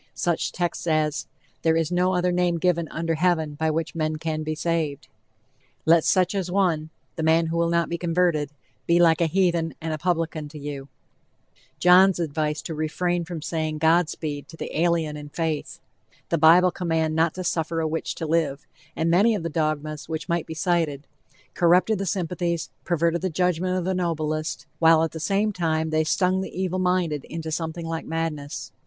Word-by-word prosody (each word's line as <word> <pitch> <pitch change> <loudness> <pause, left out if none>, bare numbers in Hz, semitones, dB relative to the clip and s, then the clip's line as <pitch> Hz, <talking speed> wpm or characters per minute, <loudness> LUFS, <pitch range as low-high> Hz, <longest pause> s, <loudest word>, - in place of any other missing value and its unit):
Such 170 -2 0
texts 175 -1 -3
as, 155 -1 0 0.3
"there 160 -1 +3
is 165 0 0
no 180 +1 +2
other 180 0 +1
named 175 -1 +1
given 170 -2 +1
under 165 0 -2
heaven 160 -2 +1
by 160 +2 -1
which 160 +1 -2
men 155 -1 -1
can 155 0 -3
be 155 0 -3
saved;" 155 -3 -2 0.8
"Let 165 0 +5
such 185 -1 +2
an 195 -1 0
one 170 -5 +1 0.3
(the - - -2
man 160 +1 +3
who 165 +1 -2
will 170 0 +2
not 170 0 +1
be 170 - -4
converted) 170 -3 +1 0.4
be 170 +1 +4
like 165 -1 +4
a 170 - +3
heathen 170 -3 +1
and 160 0 -3
a 155 - -4
publican 165 -3 -1
to 155 - -10
you;" 140 -2 -6 0.9
John's 185 +1 +6
advice 150 -2 -2
to 165 - -5
refrain 170 +3 -1
from 165 -3 -6
saying 155 -2 -2
"God 160 +1 +3
speed" 145 -3 -5
to 165 - -13
the - - -6
alien 165 -2 +1
in 150 0 -9
faith; 160 -1 -3 0.5
the 170 - +1
bible 175 +4 +6
command 165 -3 -1
not 160 0 +2
to 185 - -4
"suffer 165 -1 -1
a 160 - 0
witch 160 +1 -3
to 165 - -4
live;" 155 -3 0 0.3
and 160 - 0
many 210 +6 +4
of 190 - -4
the 170 - -2
dogmas 155 -1 -2
which 160 0 -4
might 170 -2 -1
be 160 - -6
cited, 160 -5 0 0.5
corrupted 180 +4 +3
the 195 - -2
sympathies, 175 -1 -2
perverted 170 0 +1
the 185 - -1
judgment 180 +1 0
of 180 - -2
the 190 - 0
noblest, 155 -3 -2
while 165 -1 +6
at 165 - -1
the 160 - -7
same 205 +5 +1
time 160 -3 -1
they 155 0 +2
stung 185 +3 +1
the 190 - -6
evil 185 0 -1
minded 180 -5 0
into 160 -1 -6
something 165 +1 -3
like 165 0 -4
madness. 160 -3 -4
165 Hz, 190 wpm, -24 LUFS, 155-175 Hz, 0.9 s, John's